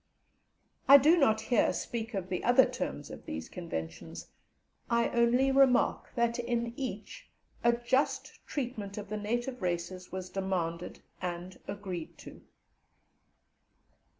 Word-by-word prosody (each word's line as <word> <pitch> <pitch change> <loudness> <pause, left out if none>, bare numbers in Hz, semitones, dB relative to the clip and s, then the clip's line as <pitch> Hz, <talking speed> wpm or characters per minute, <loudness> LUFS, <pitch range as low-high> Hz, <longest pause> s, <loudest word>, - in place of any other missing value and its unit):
I 280 - +11
do 300 +5 +6
not 220 -9 +3
here 235 +1 +3
speak 225 -1 -4
of 185 -1 -3
the 180 - -2
other 245 +2 +6
terms - - -4
of - - -10
these 80 +1 -5
Conventions, 80 - -6 0.6
I 235 0 +2
only 245 +3 +3
remark 265 -2 +3
that 235 0 +1
in 235 -1 -1
each 260 - -6 0.3
a 235 0 +5
just 240 +4 -1
treatment 225 -8 -4
of 205 -2 -6
the 215 - -2
native 240 +4 -2
races 180 +1 -3
was 185 -1 -5
demanded 180 -3 -3 0.2
and 180 0 -5
agreed 190 -5 -6
to. - - -12
220 Hz, 125 wpm, -31 LUFS, 185-245 Hz, 0.6 s, I